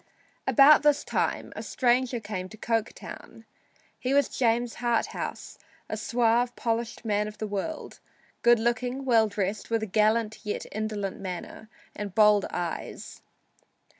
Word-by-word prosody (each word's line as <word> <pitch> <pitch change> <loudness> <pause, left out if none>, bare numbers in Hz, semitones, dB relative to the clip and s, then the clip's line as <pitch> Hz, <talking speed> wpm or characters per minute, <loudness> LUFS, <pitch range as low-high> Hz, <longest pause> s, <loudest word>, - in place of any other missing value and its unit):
About 290 +1 +7
this 295 -1 +3
time - - -2
a - - -5
stranger 250 0 +1
came 205 -4 -5
to 220 - -12
Coketown. 225 0 -4 0.5
He 260 +2 0
was 285 -2 +3
James 235 -1 +1
Harthouse, 240 -1 -2 0.3
a - - -3
suave, 240 0 +1
polished 230 0 -2
man 210 -1 +1
of 210 0 -9
the 215 - -3
world, 210 +10 -5 0.4
good 240 0 +6
looking, 245 +3 -1
well 230 -4 +4
dressed, 200 0 -3
with 225 -1 0
a - - 0
gallant 215 +2 +1
yet 210 - -3
indolent 210 -2 -3
manner 190 +3 -7 0.3
and 200 -2 -6
bold 210 -2 +5
eyes. 175 -2 -5
225 Hz, 135 wpm, -27 LUFS, 210-240 Hz, 0.5 s, About